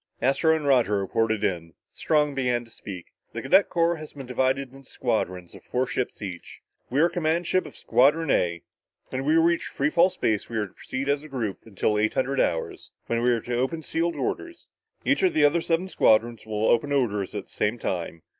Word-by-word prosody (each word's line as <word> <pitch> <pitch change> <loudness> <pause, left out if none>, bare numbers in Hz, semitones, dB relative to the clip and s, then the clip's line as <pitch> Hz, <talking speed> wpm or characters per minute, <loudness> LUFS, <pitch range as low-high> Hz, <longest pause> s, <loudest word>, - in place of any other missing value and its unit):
Astro 140 +5 +3
and 155 -2 -3
Roger 125 -7 +3
reported 110 +2 0
in. 85 -5 -2 0.2
Strong 150 -2 +1
began 125 -3 0
to 115 - -17
speak. 95 -6 -9 0.2
"The - - -5
cadet 200 - +4
corps 170 -1 +1
has 155 -1 -10
been 135 -2 -8
divided 130 +1 0
into 135 -1 -15
squadrons 90 -1 -2
of - - -13
four 125 +1 -1
ships 125 -3 -3
each. 90 -4 -8 0.3
We 135 - 0
are 170 - +6
command 170 0 0
ship 185 +3 +1
of - - -13
Squadron 150 +4 +3
A. 85 -1 +1 0.5
When 130 +1 -3
we 155 +2 +3
reach 170 +1 +3
free 145 +2 -1
fall 175 +3 +5
space, 110 - -1
we 115 - -3
are 105 - 0
to 95 - -15
proceed 130 +1 -5
as 140 0 +1
a 155 - -11
group 115 -8 -3
until 105 0 0
eight 110 +1 +1
hundred 135 +1 0
hours, 80 - -1 0.2
when 115 0 -1
we 125 - +3
are 120 -2 +2
to 120 +2 -3
open 145 +6 -1
sealed 170 +3 -1
orders. 350 -4 -4 0.4
Each - - +2
of 375 -2 +2
the 150 - +5
other 160 +4 +3
seven 165 +3 0
squadrons 115 - +2
will 110 0 -1
open 120 +5 +3
their 145 - +2
orders 105 -7 -1
at 100 - -3
the - - -20
same 105 +3 -1
time. 85 -6 -4
130 Hz, 215 wpm, -25 LUFS, 110-155 Hz, 0.5 s, are